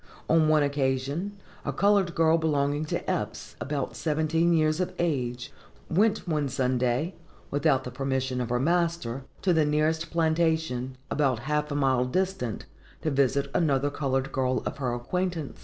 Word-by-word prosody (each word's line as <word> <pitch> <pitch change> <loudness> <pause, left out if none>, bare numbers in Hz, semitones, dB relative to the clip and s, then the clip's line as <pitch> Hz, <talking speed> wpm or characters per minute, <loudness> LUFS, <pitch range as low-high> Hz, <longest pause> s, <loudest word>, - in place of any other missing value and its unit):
On 160 -1 +4
one 155 -1 +4
occasion, 140 +7 -1 0.3
a - - -2
colored 200 -3 +2
girl 165 0 +4
belonging 145 -1 +1
to - - -2
Eppes, - - -3
about 140 -2 -3
seventeen 160 +2 +1
years 155 -1 +2
of 180 - -2
age, 125 -7 -2 0.4
went 210 +4 +2
one 150 -4 0
Sunday, 130 +4 0 0.4
without 145 -2 +2
the 125 - -6
permission 130 -1 -1
of 120 - -3
her 125 0 +1
master, 165 -5 0 0.2
to 185 - +3
the 160 -2 +4
nearest 155 +2 +1
plantation, 160 -6 0
about 135 -6 +1
half 150 +1 0
a 145 - -3
mile 130 -3 +2
distant, 155 - -2 0.4
to 155 - 0
visit 140 0 +1
another 145 -3 +2
colored 135 -2 -1
girl 130 -1 0
of - - -3
her 130 -3 -1
acquaintance. 170 +4 -3
145 Hz, 155 wpm, -27 LUFS, 130-165 Hz, 0.4 s, On